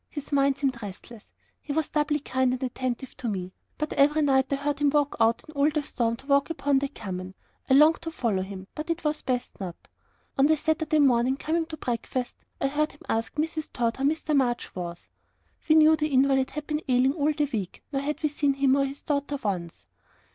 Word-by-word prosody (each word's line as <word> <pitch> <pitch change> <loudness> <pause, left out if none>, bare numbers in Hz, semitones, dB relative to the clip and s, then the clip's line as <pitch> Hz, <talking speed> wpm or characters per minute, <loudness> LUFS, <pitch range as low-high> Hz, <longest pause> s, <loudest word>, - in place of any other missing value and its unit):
His 290 -1 -7
mind 280 -1 +3
seemed 265 -4 -1
restless 210 +2 -10 0.3
he 295 - -6
was 315 0 0
doubly 300 0 +1
kind 260 -2 +1
and 255 - -4
attentive 255 0 -3
to 245 - -4
me; 185 -3 -3 0.2
but 305 0 -2
every 300 +2 +4
night 265 -1 +2
I - - +3
heard 285 +1 -2
him 290 -1 +3
go 290 0 +3
out 225 +1 +3
in 310 - -12
all 285 +1 +3
the 300 -1 -1
storm 230 -4 -1
to 255 - -16
walk 280 +1 +3
upon 280 -3 +1
the 280 - -1
common. 185 -6 -7 0.3
I 265 - +6
longed 305 +3 +6
to 330 - -4
follow 230 -11 -1
him, 190 0 -7
but 305 +2 -6
it 335 0 -2
was 300 0 -1
best 250 -1 -3
not. 180 -3 -5 0.6
On 275 - +6
the 315 0 +3
Saturday 315 0 0
morning, 260 -2 +3
coming 325 +2 -1
to 315 - -7
breakfast, 245 0 -3 0.3
I - - 0
heard 300 +2 0
him 285 - -21
ask 225 0 -1
Mrs. 315 0 -2
Tod 235 -1 -1
how 270 - -3
Mr. 305 +1 +1
March 245 -3 0
was? 175 -1 -6 0.6
We 310 - +7
knew 315 0 +7
the 305 -1 0
invalid 270 -1 +3
had 300 +1 -6
been 300 0 -2
ailing 255 +2 +4
all 305 -1 +1
the 295 0 0
week, 200 -5 -4
nor 275 - 0
had 300 +3 -3
we 305 - +3
seen 285 -1 +1
him 270 -1 +3
or 275 - +3
his 275 +1 -7
daughter 285 -1 -1
once. 170 - -3
275 Hz, 220 wpm, -26 LUFS, 245-300 Hz, 0.6 s, We